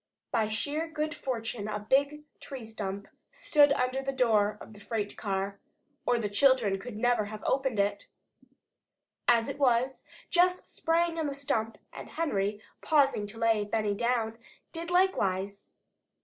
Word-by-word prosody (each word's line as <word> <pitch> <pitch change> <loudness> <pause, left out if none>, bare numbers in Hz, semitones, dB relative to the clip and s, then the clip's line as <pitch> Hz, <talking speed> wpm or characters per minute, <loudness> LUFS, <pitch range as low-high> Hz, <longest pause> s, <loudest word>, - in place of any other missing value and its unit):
By 220 - +2
sheer 290 +9 -2
good 305 -1 -2
fortune 230 -6 -4
a 210 - -2
big 280 +8 +1 0.2
tree 265 -5 -8
stump 200 -2 -5 0.2
stood 290 -2 +4
under 255 0 0
the 270 0 -2
door 215 -5 +2
of - - -12
the 205 - -14
freight 210 -1 -3
car, 195 -1 -3 0.5
or 245 - +4
the 225 -3 -1
children 205 -3 +3 0.2
never 245 -1 +3
could - - -8
have 215 0 -8
opened 265 -4 +1
it. 200 0 0 1.2
As 230 -1 +4
it - - -5
was, 255 -1 +2 0.3
Jess 360 0 +3
sprang 335 0 0
on 315 - 0
the 280 - -3
stump 225 -5 -1 0.2
and - - -9
Henry, 210 -10 -1 0.2
pausing 275 -9 +3
to 215 +2 -10
lay 225 -2 +2
Benny 210 0 0
down, 230 0 -1 0.3
did 335 0 -6
likewise. 200 - +1
235 Hz, 150 wpm, -29 LUFS, 210-280 Hz, 1.2 s, stood